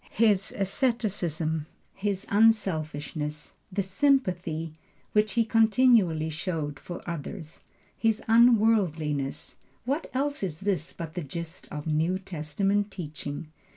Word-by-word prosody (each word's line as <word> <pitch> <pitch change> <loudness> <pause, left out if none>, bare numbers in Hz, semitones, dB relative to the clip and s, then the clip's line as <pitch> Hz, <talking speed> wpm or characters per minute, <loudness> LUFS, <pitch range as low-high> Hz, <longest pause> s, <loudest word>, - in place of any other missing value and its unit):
His 210 -3 +3
asceticism, 190 - 0 0.3
his 200 -1 -2
unselfishness, 155 -8 +1 0.2
the 195 +1 0
sympathy 185 - +1 0.4
which 210 0 +2
he 230 -1 +3
continually 220 -8 +4
showed 155 -3 -3
for 175 - -8
others, 160 -1 -6 0.3
his 225 -2 +1
unworldliness, 205 - +3 0.3
what 280 +6 -1
else 285 +2 0
is 175 -4 -3
this 190 -5 -1
but 165 -2 -7
the 180 - -3
gist 170 +4 -6
of 150 0 -6
New 160 +4 +1
Testament 195 +4 -1
teaching? 155 -4 -6
185 Hz, 110 wpm, -27 LUFS, 155-215 Hz, 0.4 s, continually